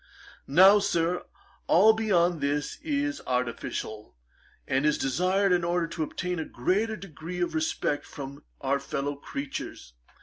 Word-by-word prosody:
Now, 190 +8 +7
Sir, 175 -3 0 0.4
all 210 +6 +6
beyond 180 -7 +2
this 145 +1 -1
is 290 -1 -1
artificial, 120 - -3 0.5
and 135 +1 +1
is 150 0 +3
desired 185 +8 +1
in 175 -1 +3
order 175 0 +1
to 170 - -5
obtain 180 +3 -2
a - - -1
greater 205 - 0
degree 180 -2 -8
of 175 -2 0
respect 155 -2 -1
from 140 +1 -8 0.2
our 140 +1 +1
fellow 140 +1 -3
creatures. 140 - -6
170 Hz, 135 wpm, -27 LUFS, 140-190 Hz, 0.5 s, Now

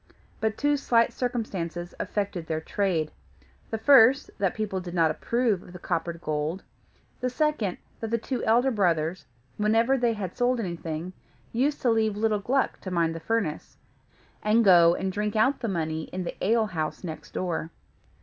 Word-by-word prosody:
But 220 0 -1
two 290 0 +2
slight 230 -4 +2
circumstances 190 -8 -3
affected 190 -5 -3
their 160 -1 -1
trade: 165 -2 -1 0.6
the 225 - -2
first, 260 +2 +6
that 195 -2 +1
people 210 -3 -2
did 180 -1 -7
not 165 -2 +4
approve 235 -6 0
of 180 - -14
the - - -7
coppered 170 -1 -3
gold; 155 +4 -2 0.6
the 250 - -1
second, 250 -8 0 0.2
that 225 - -4
the 230 - +1
two 245 +2 -3
elder 245 +4 +3
brothers, 175 -5 0 0.3
whenever 225 +5 +3
they 240 -1 +2
had 195 -5 -5
sold 245 0 +1
anything, 170 -3 -4 0.4
used 275 +5 0
to 245 - +4
leave 220 -2 +1
little 215 -1 +1
Gluck 260 +6 0
to 190 - -5
mind 170 -2 +1
the 165 - -6
furnace, 185 -4 -2 0.6
and 220 +2 +3
go 170 -3 +7
and 190 0 -2
drink 210 +2 -2
out 260 +6 +3
the 240 - -3
money 160 -4 -2
in 185 0 -5
the 170 - -5
ale 225 +2 +3
house 160 -6 -4
next 160 -3 -7
door. 170 -3 -2
205 Hz, 170 wpm, -27 LUFS, 170-230 Hz, 0.6 s, go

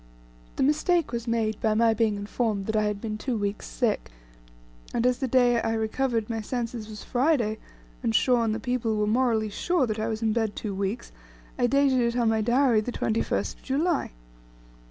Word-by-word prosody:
The - - 0
mistake 310 +4 +2
was 235 0 -4
made 225 -2 -1
by 215 -1 +2
my 225 0 +4
being 220 -1 +1
informed 205 0 -2
that 220 - -2
I 215 0 +2
had 210 -1 -1
been 215 -1 -4
two 245 0 -2
weeks 205 0 -3
sick, 235 -5 -1 0.9
and 235 - +1
as 250 0 +2
the 265 - -1
day 245 -2 +3
I 225 - -1
recovered 225 0 -1
my 225 -1 -3
senses 230 -1 -4
was 210 -1 -8
Friday, 245 -5 +1 0.4
and 110 - 0
Shaw 250 -2 +4
and 220 -1 0
the - - -3
people 230 -2 -1
were 210 - +1
morally 220 -1 +1
sure 345 - +1
that 215 -2 -3
I 220 - -1
was 220 0 -3
in 220 -1 +2
bed 220 -2 -1
two 210 -3 -4
weeks, 195 +4 -3 0.5
I 245 - +3
dated 275 -1 +3
it 235 0 0
on 235 -2 +3
my 220 0 +1
Diary 240 0 +3
the 245 - -4
21st 225 -1 -1
of - - -24
July. 305 +5 0
230 Hz, 200 wpm, -26 LUFS, 215-250 Hz, 0.9 s, my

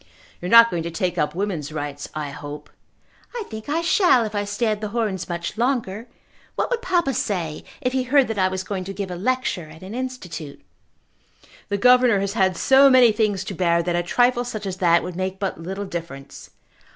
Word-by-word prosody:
"You 175 - -4
are - - -3
not 230 +1 +8
going 170 - -1
to 170 - -4
take 175 +1 -2
up 150 - 0
woman's 175 -7 -3
rights, 145 -2 -5
I 150 -2 -4
hope." 145 +1 -9 0.6
"I 470 - -3
think 220 +4 -7
I 320 +3 0
shall 335 - +4
if 215 - -6
I 205 -1 -1
stay 205 +4 -2
at 215 -1 0
The 215 - -2
Horns 205 -5 -2
much 170 +4 -4
longer. 235 -3 -1 0.5
What - - -1
would 480 -1 0
papa 350 - +1
say 175 -9 -2 0.2
if 250 - -1
he 265 - +1
heard 260 +1 +3
that 220 -2 -2
I 185 - +4
was 185 0 -3
going 190 -1 -4
to 195 - -6
give 195 -2 -5
a - - -4
lecture 205 -5 -2
at 160 +3 -13
an 190 +3 -8
Institute?" 235 - -6 1.1
"The 200 - 0
governor 250 -1 +5
has 200 0 -2
had 190 -5 +1
so 270 +5 +6
many 255 -3 +6
things 210 -3 0
to 195 - -6
bear 170 -1 +1
that 175 0 -1
a 175 - +1
trifle 245 +7 +2
such 220 -4 -6
as 190 -1 -4
that 170 -2 +3
would 180 -1 -6
make 185 +1 -3
but 190 -4 -4
little 190 +4 -5
difference." 165 -7 -8
195 Hz, 215 wpm, -22 LUFS, 175-240 Hz, 1.1 s, not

